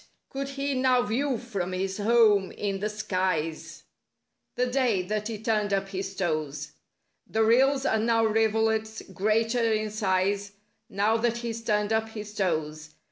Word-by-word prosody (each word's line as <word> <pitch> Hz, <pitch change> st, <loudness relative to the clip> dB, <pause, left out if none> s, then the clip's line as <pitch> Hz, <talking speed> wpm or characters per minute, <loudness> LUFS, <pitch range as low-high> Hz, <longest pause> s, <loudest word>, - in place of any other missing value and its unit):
Could 275 Hz, 0 st, -4 dB
he 275 Hz, 0 st, -2 dB
now 255 Hz, -1 st, +3 dB
view 255 Hz, +4 st, 0 dB
from 200 Hz, -7 st, -4 dB
his 190 Hz, +2 st, -2 dB
home 210 Hz, -3 st, +4 dB
in 200 Hz, -2 st, -3 dB
the 210 Hz, +2 st, -1 dB
skies— 185 Hz, -7 st, -2 dB, 0.7 s
The 250 Hz, -, +1 dB
day, 245 Hz, -7 st, +1 dB
that 210 Hz, +3 st, -2 dB
he 225 Hz, -2 st, -4 dB
turned 215 Hz, -1 st, 0 dB
up 195 Hz, 0 st, 0 dB
his 195 Hz, 0 st, -5 dB
toes; 155 Hz, -5 st, -2 dB, 0.6 s
The 220 Hz, 0 st, +1 dB
rills 265 Hz, +4 st, +3 dB
are 220 Hz, -, +2 dB
now 225 Hz, 0 st, +2 dB
rivulets—greater 220 Hz, +1 st, +1 dB
in 215 Hz, 0 st, -1 dB
size— 200 Hz, 0 st, 0 dB, 0.4 s
Now 210 Hz, +3 st, +1 dB
that 235 Hz, +1 st, 0 dB
he's 230 Hz, -1 st, -5 dB
turned 210 Hz, -1 st, +1 dB
up 220 Hz, 0 st, 0 dB
his 210 Hz, -1 st, -8 dB
toes. 155 Hz, -5 st, -2 dB
215 Hz, 145 wpm, -27 LUFS, 195-230 Hz, 0.7 s, home